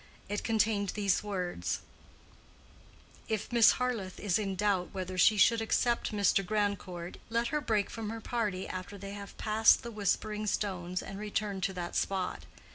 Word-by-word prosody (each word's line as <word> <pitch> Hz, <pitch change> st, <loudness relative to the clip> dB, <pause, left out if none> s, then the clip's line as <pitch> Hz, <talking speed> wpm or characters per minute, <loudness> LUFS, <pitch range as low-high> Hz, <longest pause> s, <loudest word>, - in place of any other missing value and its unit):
It 205 Hz, +1 st, -3 dB
contained 215 Hz, -3 st, +1 dB
these 200 Hz, -3 st, +2 dB
words, 180 Hz, -, -3 dB, 1.5 s
If 220 Hz, +1 st, -2 dB
Miss 235 Hz, -2 st, +7 dB
Harleth 235 Hz, -7 st, -2 dB
is 205 Hz, 0 st, +1 dB
in 195 Hz, -2 st, -2 dB
doubt 190 Hz, -2 st, +1 dB
whether 185 Hz, -1 st, -4 dB
she 210 Hz, +4 st, +5 dB
should 230 Hz, +3 st, +5 dB
accept 235 Hz, +2 st, +1 dB
Mr. 200 Hz, -1 st, +3 dB
Grandcourt, 190 Hz, -3 st, -2 dB
let 235 Hz, +1 st, 0 dB
her 300 Hz, -, 0 dB
break 215 Hz, -6 st, 0 dB
from 225 Hz, -2 st, -4 dB
her 225 Hz, +1 st, -4 dB
party 210 Hz, -5 st, -2 dB
after 185 Hz, +2 st, -6 dB
they 195 Hz, 0 st, -7 dB
have 200 Hz, 0 st, -9 dB
passed 220 Hz, +1 st, +4 dB
the 235 Hz, -, -6 dB
Whispering 210 Hz, 0 st, -1 dB
Stones 185 Hz, -3 st, -1 dB
and 195 Hz, 0 st, -7 dB
return 205 Hz, -2 st, -2 dB
to 190 Hz, +1 st, 0 dB
that 175 Hz, -2 st, -5 dB
spot. 185 Hz, -, -1 dB
205 Hz, 160 wpm, -31 LUFS, 185-220 Hz, 1.5 s, Miss